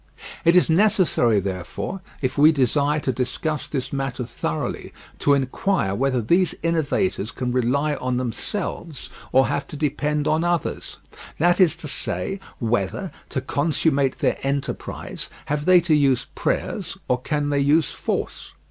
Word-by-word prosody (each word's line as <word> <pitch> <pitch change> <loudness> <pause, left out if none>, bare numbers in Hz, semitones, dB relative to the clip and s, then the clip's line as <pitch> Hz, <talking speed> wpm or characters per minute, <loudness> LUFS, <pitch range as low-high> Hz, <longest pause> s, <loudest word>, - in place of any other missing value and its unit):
It 170 +1 +5
is 180 - +5
necessary, 165 - +3
therefore, 95 - -4 0.2
if 130 - 0
we 150 +2 +7
desire 145 +1 +2
to 130 - 0
discuss 140 +4 -2
this 135 -2 -4
matter 135 -2 -2
thoroughly, 80 -9 -4 0.3
to 145 - +4
inquire 135 - 0
whether 130 +2 0
these 175 - +2
innovators 165 - 0
can 125 0 -3
rely 130 +5 +1
on 125 -3 -2
themselves 150 - -4 0.2
or 130 +1 +5
have 145 0 -2
to - - -8
depend 150 0 0
on 160 +2 +2
others: 175 -1 -2 0.4
that 175 +3 +3
is 170 -3 +5
to 165 -2 -8
say, 195 +6 -2 0.2
whether, 110 -5 -1 0.2
to - - -2
consummate 145 -2 +1
their - - 0
enterprise, 140 0 -3 0.2
have 150 0 -2
they 185 -1 +7
to 170 -2 +1
use 140 -4 +3
prayers - - -2
or 125 0 +1
can 145 +1 -1
they 140 - +2
use 150 +3 +3
force? - - -4
145 Hz, 150 wpm, -23 LUFS, 125-160 Hz, 0.4 s, we